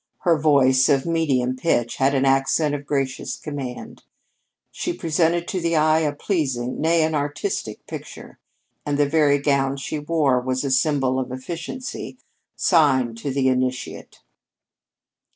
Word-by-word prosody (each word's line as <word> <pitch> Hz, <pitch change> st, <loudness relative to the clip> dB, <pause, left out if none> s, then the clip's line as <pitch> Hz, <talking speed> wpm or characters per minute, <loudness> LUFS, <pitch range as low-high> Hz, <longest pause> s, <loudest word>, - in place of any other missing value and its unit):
Her 170 Hz, -2 st, +3 dB
voice, 135 Hz, -3 st, +4 dB
of 135 Hz, -2 st, +2 dB
medium 140 Hz, -7 st, 0 dB
pitch, 130 Hz, -4 st, 0 dB
had 135 Hz, +1 st, +2 dB
an 135 Hz, 0 st, +2 dB
accent 135 Hz, +3 st, +2 dB
of 145 Hz, -1 st, -5 dB
gracious 135 Hz, -3 st, -2 dB
command. 140 Hz, -5 st, -7 dB, 0.7 s
She 350 Hz, -, -3 dB
presented 170 Hz, -, 0 dB
to 185 Hz, -, -2 dB
the 170 Hz, 0 st, 0 dB
eye 155 Hz, +1 st, +4 dB
a 155 Hz, -2 st, 0 dB
pleasing, 135 Hz, -, -2 dB
nay, 165 Hz, 0 st, +3 dB
an 160 Hz, 0 st, 0 dB
artistic, 145 Hz, -, -3 dB
picture, -, -, -10 dB, 0.4 s
and 145 Hz, -1 st, -1 dB
the 145 Hz, -, +3 dB
very 145 Hz, -1 st, +3 dB
gown 140 Hz, -1 st, 0 dB
she 150 Hz, +3 st, -4 dB
wore 145 Hz, -4 st, +1 dB
was 130 Hz, +1 st, -2 dB
a 140 Hz, -, -1 dB
symbol 130 Hz, -1 st, +1 dB
of 125 Hz, -1 st, -4 dB
efficiency 170 Hz, -, -6 dB, 0.4 s
sign 135 Hz, -9 st, +3 dB
to 130 Hz, +5 st, -4 dB
the 130 Hz, 0 st, +1 dB
initiate. 130 Hz, -1 st, -2 dB
145 Hz, 145 wpm, -22 LUFS, 130-160 Hz, 0.7 s, voice